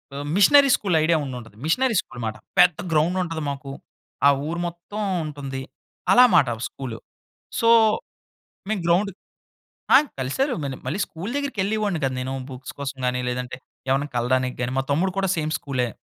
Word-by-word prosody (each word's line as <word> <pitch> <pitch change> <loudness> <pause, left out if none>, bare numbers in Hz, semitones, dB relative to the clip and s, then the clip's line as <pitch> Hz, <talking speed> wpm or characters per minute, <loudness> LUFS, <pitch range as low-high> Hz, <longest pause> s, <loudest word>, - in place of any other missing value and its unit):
ఆ! - - -4 0.2
Missionary 275 +8 +6
school 190 -5 -1
idea 165 0 +3
ఉండి 130 -2 -5
ఉంటది. 115 -3 -14
మిషనరీ 245 +7 +2
స్కూల్ - - -15
అన్నమాట. 110 -2 -3 0.2
పెద్ద 180 -3 +6
గ్రౌండ్ 160 +4 +2
ఉంటది 165 -2 -4
మాకు. 140 0 -6 0.6
ఆ! - - +8 0.2
ఊరు 170 +2 -3
మొత్తం 175 +5 -7 0.2
ఉంటుంది. 140 -3 -5 0.5
అలా 250 - +8
మాట 135 - +5 0.2
స్కూల్. 130 -4 -7 0.6
సో 230 - +3 1.0
మేము 215 -4 -1
గ్రౌండ్ 195 +4 +3 0.8
ఆహ్, 285 +3 +7
కలిసారు 245 - 0
మళ్ళీ 135 -2 -4
మళ్ళీ 155 +10 -2
స్కూల్ 180 +8 -7
దగ్గరికి 280 -7 -3
ఎళ్ళేవాడిని 205 -4 -1
కదా 135 -1 0
నేను 130 +1 -3 0.2
బుక్స్ 130 0 -8
కోసం 140 -1 -4
గాని, 125 0 0
లేదంటే 125 0 -4 0.3
ఎవరైనా 140 +2 +1
కలడానికి 125 +1 +1
గాని 120 +1 -1
మా 135 - +1
తమ్ముడు 180 +6 +1
కూడా 195 -1 +1
సేమ్ 155 0 -1
స్కూలే. 130 -3 -2
155 Hz, 165 wpm, -23 LUFS, 130-195 Hz, 1.0 s, ఆ